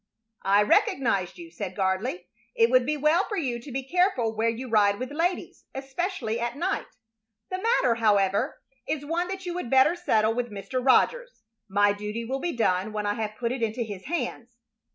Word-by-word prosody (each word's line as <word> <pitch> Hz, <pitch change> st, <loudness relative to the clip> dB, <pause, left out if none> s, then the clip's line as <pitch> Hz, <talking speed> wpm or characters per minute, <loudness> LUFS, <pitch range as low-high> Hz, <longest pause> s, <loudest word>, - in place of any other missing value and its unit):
"I 200 Hz, +1 st, +4 dB
recognized 260 Hz, -, +1 dB
you," 335 Hz, -1 st, -10 dB
said 195 Hz, -, -6 dB
Gardley. 190 Hz, 0 st, -1 dB, 0.3 s
"It 230 Hz, +1 st, +4 dB
would 255 Hz, 0 st, +4 dB
be 300 Hz, 0 st, 0 dB
well 305 Hz, +6 st, +3 dB
for 410 Hz, -, -4 dB
you 255 Hz, -8 st, -1 dB
to 265 Hz, +4 st, -10 dB
be 265 Hz, +1 st, -4 dB
careful 320 Hz, -, +1 dB
where 225 Hz, +1 st, +1 dB
you 235 Hz, +3 st, -4 dB
ride 205 Hz, -3 st, +3 dB
with 255 Hz, +3 st, -5 dB
ladies, 340 Hz, +5 st, -2 dB
especially 270 Hz, -, -3 dB
at 240 Hz, +2 st, -3 dB
night. 370 Hz, +5 st, -1 dB, 0.6 s
The 370 Hz, 0 st, -3 dB
matter, 455 Hz, -, +3 dB
however, 210 Hz, +2 st, +1 dB, 0.3 s
is 290 Hz, -2 st, -2 dB
one 340 Hz, +4 st, -1 dB
that 380 Hz, 0 st, -6 dB
you 350 Hz, -, -3 dB
would 355 Hz, -9 st, -4 dB
better 270 Hz, +6 st, +5 dB
settle 225 Hz, -11 st, +2 dB
with 240 Hz, 0 st, -2 dB
Mr. 205 Hz, +5 st, -4 dB
Rogers. -, -, +2 dB, 0.3 s
My 205 Hz, +1 st, +3 dB
duty 210 Hz, +3 st, -5 dB
will 265 Hz, +3 st, -2 dB
be 340 Hz, -3 st, -3 dB
done 195 Hz, -1 st, +1 dB
when 210 Hz, -1 st, -2 dB
I 205 Hz, -, +1 dB
have 215 Hz, -1 st, -4 dB
put 235 Hz, -1 st, -1 dB
it 255 Hz, -1 st, -3 dB
into 225 Hz, +2 st, -1 dB
his 205 Hz, -4 st, -8 dB
hands." 250 Hz, -7 st, -4 dB
245 Hz, 195 wpm, -26 LUFS, 215-325 Hz, 0.6 s, better